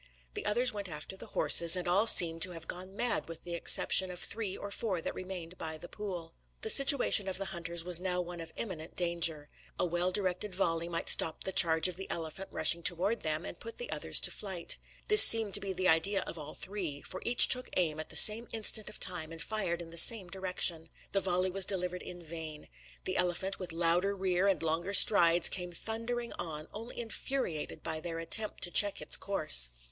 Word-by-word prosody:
The -, -, -5 dB
others 245 Hz, +4 st, +1 dB
went 200 Hz, -2 st, -7 dB
after 150 Hz, +4 st, -6 dB
the -, -, -7 dB
horses, 170 Hz, +1 st, +3 dB
and 180 Hz, -1 st, -4 dB
all 195 Hz, +6 st, +1 dB
seemed 165 Hz, -5 st, +6 dB
to 185 Hz, -, +4 dB
have 165 Hz, -1 st, -9 dB
gone 185 Hz, +2 st, -6 dB
mad 240 Hz, -5 st, -2 dB
with 165 Hz, -, -10 dB
the 175 Hz, -, -7 dB
exception 185 Hz, +2 st, +3 dB
of 180 Hz, -1 st, -7 dB
three 205 Hz, 0 st, -1 dB
or 200 Hz, -, -9 dB
four 200 Hz, -4 st, -4 dB
that -, -, -6 dB
remained 185 Hz, -2 st, -9 dB
by 160 Hz, -1 st, -6 dB
the 175 Hz, -, -12 dB
pool. 180 Hz, -6 st, -8 dB, 0.3 s
The 220 Hz, -, +3 dB
situation 275 Hz, -7 st, +5 dB
of 190 Hz, -, -2 dB
the 195 Hz, -, -4 dB
hunters 170 Hz, -1 st, -5 dB
was 175 Hz, -1 st, +2 dB
now 180 Hz, -1 st, -3 dB
one 175 Hz, -1 st, -7 dB
of 165 Hz, -1 st, -10 dB
imminent 175 Hz, -8 st, -7 dB
danger. 170 Hz, -4 st, -1 dB, 0.3 s
A -, -, -1 dB
well 175 Hz, +1 st, -2 dB
directed 185 Hz, 0 st, -1 dB
volley 170 Hz, -3 st, -2 dB
might 170 Hz, -, -5 dB
stop 160 Hz, -, +4 dB
the 190 Hz, -, -4 dB
charge 160 Hz, -2 st, +4 dB
of 180 Hz, -1 st, -4 dB
the 190 Hz, -, -9 dB
elephant 170 Hz, +4 st, -6 dB
rushing 170 Hz, -, +1 dB
towards 185 Hz, +6 st, 0 dB
them, 155 Hz, +1 st, -3 dB
and -, -, -9 dB
put 460 Hz, -, -11 dB
the 485 Hz, 0 st, -8 dB
others -, -, +1 dB
to -, -, +5 dB
flight. 190 Hz, -4 st, -2 dB, 0.3 s
This 425 Hz, 0 st, +10 dB
seemed 225 Hz, -3 st, +8 dB
to -, -, +6 dB
be 195 Hz, -, -5 dB
the 185 Hz, 0 st, -2 dB
idea 180 Hz, +5 st, +2 dB
of -, -, -6 dB
all 155 Hz, -2 st, -9 dB
three; 180 Hz, -8 st, -6 dB
for 185 Hz, -, -8 dB
each 240 Hz, +1 st, +5 dB
took 255 Hz, 0 st, +1 dB
aim 160 Hz, -4 st, -1 dB
at 155 Hz, -, -7 dB
the -, -, -9 dB
same 225 Hz, +2 st, +6 dB
instant 215 Hz, -1 st, +2 dB
of 215 Hz, -, -11 dB
time 170 Hz, -4 st, -2 dB
and 165 Hz, -, -10 dB
fired 175 Hz, -2 st, -4 dB
in 165 Hz, -, -14 dB
the 170 Hz, -, -1 dB
same 195 Hz, 0 st, +5 dB
direction. 180 Hz, -3 st, -3 dB, 0.2 s
The 195 Hz, -, -1 dB
volley 185 Hz, 0 st, -2 dB
was 195 Hz, +1 st, -1 dB
delivered 180 Hz, -2 st, 0 dB
in 175 Hz, -1 st, -10 dB
vain. 160 Hz, -2 st, -9 dB, 0.4 s
The -, -, -3 dB
elephant, 180 Hz, +2 st, -2 dB
with 185 Hz, -2 st, -7 dB
louder 175 Hz, +4 st, -1 dB
rear 190 Hz, 0 st, -1 dB
and 190 Hz, -5 st, -1 dB
longer 165 Hz, +5 st, -3 dB
strides, 175 Hz, -4 st, +3 dB
came 180 Hz, -1 st, -2 dB
thundering 230 Hz, +5 st, -5 dB
on, 155 Hz, -2 st, -7 dB
only 225 Hz, +4 st, -9 dB
infuriated 230 Hz, -, -5 dB
by 155 Hz, -, -4 dB
their 165 Hz, 0 st, -7 dB
attempt 185 Hz, +6 st, 0 dB
to 175 Hz, -, +3 dB
check 205 Hz, +1 st, +3 dB
its -, -, +2 dB
course. 155 Hz, -, 0 dB
180 Hz, 215 wpm, -30 LUFS, 165-200 Hz, 0.4 s, This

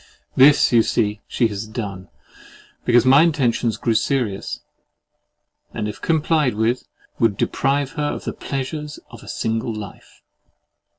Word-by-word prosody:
This, 140 Hz, +2 st, +6 dB
you 120 Hz, -2 st, +6 dB
see, 105 Hz, -2 st, 0 dB
she 120 Hz, -, +1 dB
has 105 Hz, +1 st, -5 dB
done, 100 Hz, -5 st, -6 dB, 0.8 s
because 120 Hz, 0 st, +4 dB
my 135 Hz, +3 st, +7 dB
intentions 125 Hz, -8 st, +1 dB
grew 115 Hz, -, 0 dB
serious, 110 Hz, -2 st, -1 dB, 1.1 s
and 110 Hz, -2 st, -2 dB
if 105 Hz, -, -7 dB
complied 155 Hz, -5 st, +1 dB
with, 115 Hz, +3 st, 0 dB, 0.3 s
would 110 Hz, -4 st, +2 dB
deprive 135 Hz, +3 st, 0 dB
her 150 Hz, -2 st, -3 dB
of -, -, -6 dB
THE -, -, -4 dB
PLEASURES 145 Hz, +2 st, -5 dB
OF -, -, -11 dB
A -, -, -14 dB
SINGLE 115 Hz, +1 st, -2 dB
LIFE! 105 Hz, -3 st, -10 dB
120 Hz, 135 wpm, -21 LUFS, 110-140 Hz, 1.1 s, my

